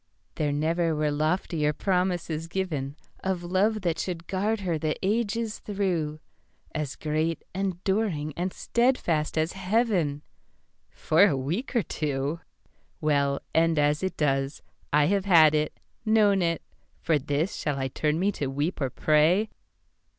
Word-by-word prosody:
There 150 -2 -1
never 160 +3 +1
were 150 0 +1
loftier 155 0 0
promises 175 -3 -1
givenOf 160 -7 -3 0.5
love 200 +5 +1
that 170 -3 -1
should 170 -2 -4
guard 205 +4 -1
her 170 -4 -1
the 155 0 0
ages 220 +1 0
through, 175 -7 -2 0.5
As 150 -3 -3
great, 155 +2 -1
enduring 190 -4 -1
and 180 +2 -2
steadfast 180 -14 0
as 160 +2 +1
Heaven—For 185 -3 0
a 145 -8 +1
week 170 - -3
or 235 - +3
two. 145 +1 -2 0.6
Well, 140 -2 +1
end 165 0 +3
as 150 0 +2
it 190 0 -2
does, 135 -1 0 0.3
I 150 0 +4
have 195 +3 +1
had 160 -5 +7
it, 150 0 -1 0.2
known 215 -3 +4
it, 165 -1 0 0.4
For 160 -3 +2
this 145 +6 -1
shall 145 -2 -2
I 135 -1 -1
turn 150 +4 0
me 200 +3 +2
to 145 -8 -3
weep 145 +6 -2
or 135 - +1
pray? 160 - +3
165 Hz, 135 wpm, -27 LUFS, 150-190 Hz, 0.6 s, had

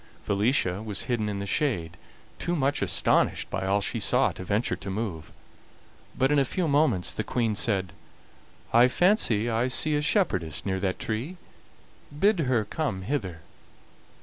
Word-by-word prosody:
Felicia 100 -2 +1
was 105 -2 -2
hidden 115 -4 -1
in 100 - -3
the 100 - -4
shade, 90 - -1 0.4
too 175 +1 -1
much 140 -2 0
astonished - - +1
by 95 0 -2
all 100 +1 +2
she - - -2
saw - - +3
to - - -8
venture 100 +5 0
to - - -8
move; 95 -6 -4 0.9
but 130 +2 +2
in 145 - +4
a - - +4
few 170 +6 -2
moments 140 - +2
the 110 - -3
Queen 115 -1 -1
said: 100 -3 0 0.8
"I 120 +2 +7
fancy 130 - +2
I 115 +1 +1
see 150 +4 +1
a 145 - +1
shepherdess 95 - 0
near 95 -1 -1
that 95 -1 -1
tree; 120 +12 -4 0.8
bid 205 0 +3
her 125 -7 +1
come 105 -6 -3
hither." 95 - -3
110 Hz, 160 wpm, -26 LUFS, 95-140 Hz, 0.9 s, I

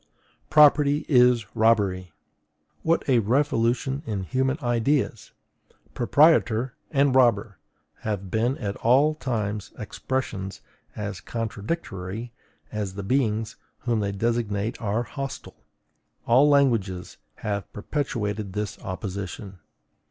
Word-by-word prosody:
PROPERTY 150 -1 +5
IS 125 -4 +5
ROBBERY!... 100 -6 +2 0.7
What 165 +1 +1
a 130 -4 +4
revolution 125 +2 +1
in 100 -4 -2
human 130 +6 0
ideas! 120 -2 0 0.6
PROPRIETOR 125 -3 +3 0.2
and 140 -2 +3
ROBBER 115 -6 +3 0.4
have 100 -4 -4
been 120 +5 +1
at 100 -3 -3
all 135 +6 +4
times 110 -8 -3
expressions 105 -3 -4 0.3
as 105 -3 -5
contradictory 110 - -4 0.4
as 105 -3 -4
the 100 - -5
beings 110 -2 0 0.2
whom 120 -3 0
they 100 -1 -1
designate 110 0 -1
are 110 +2 0
hostile; 135 +2 -7 0.6
all 130 +5 +5
languages 115 -11 +1 0.2
have 100 -1 -4
perpetuated 105 -5 -3
this 105 0 -4
opposition. 95 0 -6
115 Hz, 100 wpm, -25 LUFS, 100-130 Hz, 0.7 s, PROPERTY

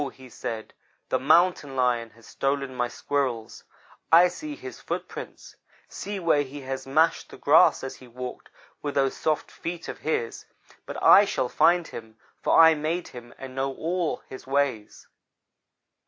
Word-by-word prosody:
he 130 -1 -13
said, 110 -1 -6 0.4
'the - - +1
Mountain 155 -1 +3
lion 120 -3 +1
has 115 +1 -20
stolen 135 -1 -2
my 120 -1 -1
Squirrels. 120 -3 -3 0.5
I 175 +2 +8
see 295 - -7
his 385 +5 -9
footprints; - - -7 0.3
see 205 -1 -6
where 165 -4 +3
he 145 +1 -7
has 135 0 -5
mashed 160 +4 +2
the - - -11
grass - - +5
as 135 - -6
he 130 - -15
walked 125 +1 -8 0.3
with 145 -1 -4
those 135 -1 +2
soft 155 -1 -1
feet 170 0 -6
of - - -6
his; 120 -7 -3 0.4
but - - -6
I 205 - +8
shall 130 -9 -1
find 175 +4 +3
him, 110 -1 -10 0.2
for - - +4
I 160 0 +9
made 160 +3 -2
him 120 -1 -11
and 130 -1 -9
know 135 0 -2
all 170 0 -2
his 130 - -10
ways.' 135 -6 -1
135 Hz, 160 wpm, -26 LUFS, 125-165 Hz, 0.5 s, I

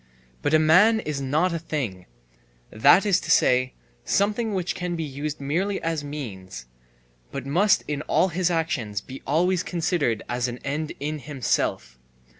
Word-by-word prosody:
But 145 - +2
a - - +8
man 180 +9 +5
is 150 -8 -4
not 155 +7 +1
a 165 - -2
thing, 125 - -4 0.6
that 160 - +5
is 200 -4 +3
to - - -9
say, 130 0 +3 0.3
something 210 - 0
which 180 -2 -1
can 180 -1 -3
be 165 - -3
used 145 +1 -5
merely 175 +9 -1
as 165 -2 -1
means, 100 - -7 0.7
but 140 -2 -5
must 185 +9 +3
in 150 -1 -2
all 190 - +3
his 180 +1 0
actions 140 - -1
be 130 +5 -10
always 175 +5 +2
considered 165 - -1
as 120 0 -1
an 120 0 -5
end 150 +2 -3
in 150 +2 -3
himself. 120 - -2
150 Hz, 160 wpm, -24 LUFS, 130-175 Hz, 0.7 s, a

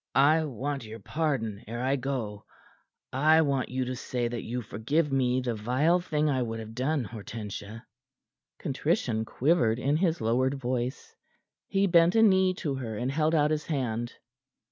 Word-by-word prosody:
"I 155 +3 +5
want 140 +1 -3
your 110 0 -8
pardon 115 -4 -2
ere 120 +2 -4
I 135 +2 +2
go. 125 -6 -4 0.7
I 155 +4 +5
want 140 -3 0
you 130 0 -1
to 130 +1 -3
say 125 -1 -2
that 120 -1 -4
you 120 +1 -4
forgive 140 +9 -1
me 130 -1 +2
the 125 -2 -1
vile 130 +11 +2
thing 155 -3 0
I 135 -3 +1
would 115 -2 -3
have 110 0 -8
done, 135 +4 0
Hortensia." 110 0 -7 0.7
Contrition 130 - -1
quivered 120 -4 +2
in 140 +4 +1
his 170 -1 +1
lowered 125 +4 +1
voice. 125 -1 -3 0.5
He 195 0 +2
bent 170 0 +5
a 225 - +6
knee 190 -3 +4
to 150 -6 -2
her, 120 -5 -4
and 125 +4 -1
held 155 +3 +1
out 150 -1 +3
his 155 -1 -1
hand. 120 -5 -2
130 Hz, 165 wpm, -28 LUFS, 115-155 Hz, 0.7 s, a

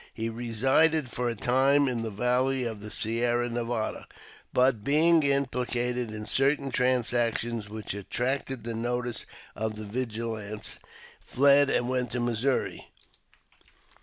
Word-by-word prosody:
He 115 0 -2
resided 130 +6 +2
for 125 0 -1
a 115 - -3
time 135 +5 +3
in 120 -3 -1
the 115 - -3
valley 125 +5 +1
of 110 -3 -4
the 105 +1 -8
Sierra 120 +3 0
Nevada, 115 -2 -3 0.4
but 125 -4 +2
being 160 +5 +4
im 140 -1 +2
plicated 125 -1 -2
in 105 0 -6
certain 135 +5 +1
transactions 120 -3 0
which 110 -2 -5
attracted 125 +4 -3
the 115 0 -4
notice 120 0 -2 0.3
of 110 0 -3
the 105 0 -7
vigilants, 110 -2 -4 0.4
fled 140 +1 +4
and 120 - +1
went 125 -1 -1
to 125 - -1
Missouri. 120 +2 -1
120 Hz, 135 wpm, -28 LUFS, 115-130 Hz, 0.4 s, being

